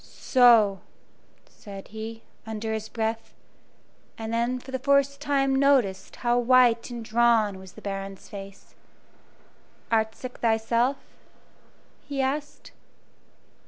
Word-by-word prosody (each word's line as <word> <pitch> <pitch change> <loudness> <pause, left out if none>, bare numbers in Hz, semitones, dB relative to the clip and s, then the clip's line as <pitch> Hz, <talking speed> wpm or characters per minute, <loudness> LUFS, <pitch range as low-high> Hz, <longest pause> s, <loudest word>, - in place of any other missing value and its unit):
"So!" 230 -6 +4 0.7
said 195 -2 -11
he, 220 +1 -7 0.2
under 220 0 -3
his 220 0 -4
breath, 225 0 -3 0.8
and 225 0 -5
then 235 +2 0
for 260 +1 -11
the 260 - -2
first 280 +1 +2
time 275 -2 +1
noticed 265 -9 +2
how 240 0 +1
white 245 -1 +4
and 235 -2 -7
drawn 220 -3 +2
was 190 -1 -13
the - - -14
Baron's 195 -1 -6
face. 195 -1 -11 1.2
"Art 220 -1 +1
sick 255 -1 -9
thyself?" 235 +3 +1 1.1
he 285 -1 -4
asked. 280 +3 -3
230 Hz, 115 wpm, -26 LUFS, 220-260 Hz, 1.2 s, So